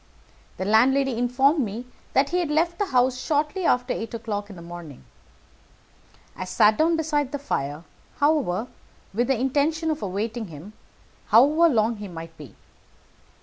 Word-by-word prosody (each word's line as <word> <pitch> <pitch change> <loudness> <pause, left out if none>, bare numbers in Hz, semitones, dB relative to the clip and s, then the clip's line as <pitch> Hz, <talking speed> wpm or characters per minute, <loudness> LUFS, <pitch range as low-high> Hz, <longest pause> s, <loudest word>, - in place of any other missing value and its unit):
The 185 - -3
landlady 260 +5 +3
informed 250 +6 +2
me 230 -1 -3 0.3
that 275 +1 +3
he 360 - 0
had 345 -4 -1
left 335 +3 0
the 410 - 0
house 255 -2 +2
shortly 305 +5 -1
after 250 -2 +2
eight 225 +1 -5
o'clock 210 -2 -4
in 200 - -10
the 170 - -11
morning. 170 -5 -10 1.3
I - - -5
sat 210 +3 +3
down 325 +1 +3
beside 295 -4 -1
the 285 - -2
fire, 150 - -3 0.3
however, 280 - +1 0.5
with 235 +4 0
the 265 -4 +1
intention 300 +5 +1
of 310 - -4
awaiting 215 +4 -3
him, 165 +6 -11 0.5
however 295 +10 +5
long 225 -1 +1
he 205 0 -7
might 165 -2 -9
be. 150 -5 -12
245 Hz, 155 wpm, -24 LUFS, 205-295 Hz, 1.3 s, however